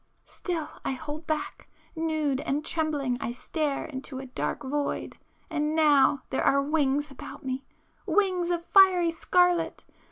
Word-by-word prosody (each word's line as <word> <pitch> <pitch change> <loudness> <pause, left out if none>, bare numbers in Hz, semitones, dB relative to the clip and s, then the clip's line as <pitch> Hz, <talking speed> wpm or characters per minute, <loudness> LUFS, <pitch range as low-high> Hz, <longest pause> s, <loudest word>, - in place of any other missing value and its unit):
Still 330 -4 -4 0.2
I - - -1
hold 305 +3 -7
back,—nude 310 -1 -3
and 295 +3 -2
trembling 290 -6 -1
I 235 - -2
stare 295 +2 -2
into 265 -2 -7
a 265 - -6
dark 255 +3 -3
void—and 295 +2 -3
now 290 -3 +4
there 265 - 0
are 280 - +4
wings 290 -1 +1
about 275 +2 -10
me,—wings 355 +7 -2
of 340 -1 -1
fiery 365 -3 +6
scarlet! 355 0 +2
300 Hz, 125 wpm, -27 LUFS, 275-330 Hz, 0.2 s, fiery